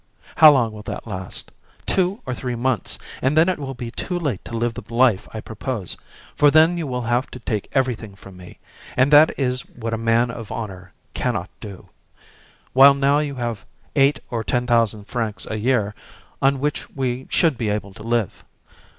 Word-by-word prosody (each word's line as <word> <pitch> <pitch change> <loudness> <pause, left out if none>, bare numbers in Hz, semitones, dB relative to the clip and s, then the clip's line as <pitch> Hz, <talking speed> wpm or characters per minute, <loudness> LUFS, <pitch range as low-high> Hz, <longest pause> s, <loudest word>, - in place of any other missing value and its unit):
How 155 - +10
long 125 -6 +2
will 105 -1 -9
that - - -6
last? 95 -4 -7 0.3
Two 190 +3 +1
or 130 - -3
three 125 0 -4
months, 120 -2 -1 0.2
and 135 +4 +1
then 160 +2 +6
it 185 -4 0
will 135 -2 -5
be 120 -1 -6
too 180 +7 -3
late 145 - -2
to 115 - -5
live 120 0 0
the - - -7
life 115 -4 +3
I 110 - -6
propose, 110 -3 -5 0.4
for 145 - +5
then 160 +4 +5
you 165 -3 -3
will 125 -2 -3
have 120 +3 0
to 125 - -9
take 110 -3 -3
everything 120 -6 -1
from 100 -1 -14
me, 90 -1 -13 0.4
and 130 +2 +4
that 150 +2 +7
is 125 -2 0
what 115 -2 -6
a 115 - -1
man 115 +1 +2
of 115 -2 -8
honour 95 -5 -6 0.2
can - - -1
not - - -4
do; 100 -3 -10 0.9
while 140 +2 +8
now 140 +1 +3
you 145 -2 -2
have 120 -4 -4 0.3
eight 140 0 +4
or 115 -2 -2
ten 120 +2 0
thousand 115 -4 +2
francs 110 -3 -3
a 110 - -2
year, 110 -3 +1 0.5
on 135 0 +3
which 150 +2 -2
we 130 -1 -2
should 160 -5 +3
be 115 -2 -2
able 105 -1 -3
to 105 - -13
live. 115 -3 -1
120 Hz, 195 wpm, -22 LUFS, 110-135 Hz, 0.9 s, How